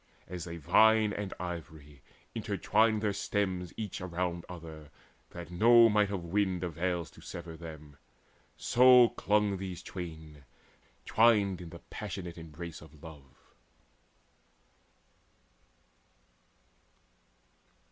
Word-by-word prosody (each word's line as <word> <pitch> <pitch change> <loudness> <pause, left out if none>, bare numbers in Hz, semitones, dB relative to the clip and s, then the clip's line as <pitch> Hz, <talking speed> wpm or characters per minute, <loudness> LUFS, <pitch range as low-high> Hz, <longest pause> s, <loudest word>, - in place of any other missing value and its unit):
And 90 - -8
as 90 -1 -6
a 85 0 -6
vine 110 +6 +4
and 100 -1 -4
ivy 80 -5 -8 0.3
entwine 110 0 +1
their 105 -2 0
stems 95 -3 -2
Each 105 -5 -5
around 85 -1 -3
other, 80 -4 -10 0.4
that 85 0 -9
no 115 +5 +6
might 105 -1 +3
of 95 -3 -3
wind 95 0 0
Avails 85 0 -2
to - - -16
sever 85 -1 -8
them, 75 -3 -11 0.6
so 125 -1 +6
clung 105 -1 +1
these 95 -2 -6
twain 80 -5 -8 0.6
Twined 105 -5 +3
in 85 - -8
the 85 +1 -12
passionate 90 -4 -6
embrace 80 +1 -9
of 75 +1 -16
love. 75 -5 -14
90 Hz, 105 wpm, -31 LUFS, 80-105 Hz, 0.6 s, no